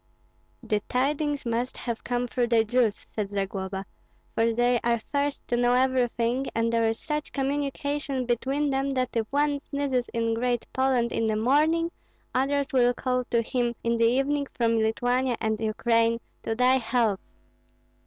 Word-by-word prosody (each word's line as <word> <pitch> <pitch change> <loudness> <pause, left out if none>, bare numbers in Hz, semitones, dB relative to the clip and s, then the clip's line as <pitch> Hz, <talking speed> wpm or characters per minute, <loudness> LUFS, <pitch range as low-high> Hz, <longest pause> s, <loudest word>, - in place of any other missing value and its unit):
"The 210 - 0
tidings 285 +2 0
must 235 +2 -2
have 235 -2 -4
come 245 0 -1
through 245 0 0
the 230 -1 +4
Jews," 225 -1 +1
said 210 -2 -2
Zagloba; 195 -1 -3 0.5
"for 230 +1 +2
they 240 +1 +2
are 235 0 +2
first 285 +5 -3
to 240 - 0
know 245 0 +3
everything, 250 0 +1
and 230 0 +1
there 230 -1 +3
is 225 - -2
such 300 0 -3
communication 280 -1 -2
between 270 +4 0
them 270 +1 0
that 255 -1 -1
if 225 -1 0
one 290 0 +1
sneezes 280 -4 -2
in 230 -1 0
Great 240 +1 0
Poland 260 -3 +2
in 225 - 0
the 215 - +1
morning, 305 +9 +2 0.4
others 280 +2 0
will 245 -1 +4
call 250 -1 -1
to 235 -1 +1
him 240 0 -1
in 235 0 +1
the 230 - +3
evening 275 +4 +1
from 230 -1 +2
Lithuania 245 +3 +1
and 220 -1 -1
the 225 - -2
Ukraine, 230 +1 +2 0.2
'To 225 - -2
thy 250 +2 +4
health!'" 230 -4 +1
245 Hz, 165 wpm, -26 LUFS, 230-270 Hz, 0.5 s, the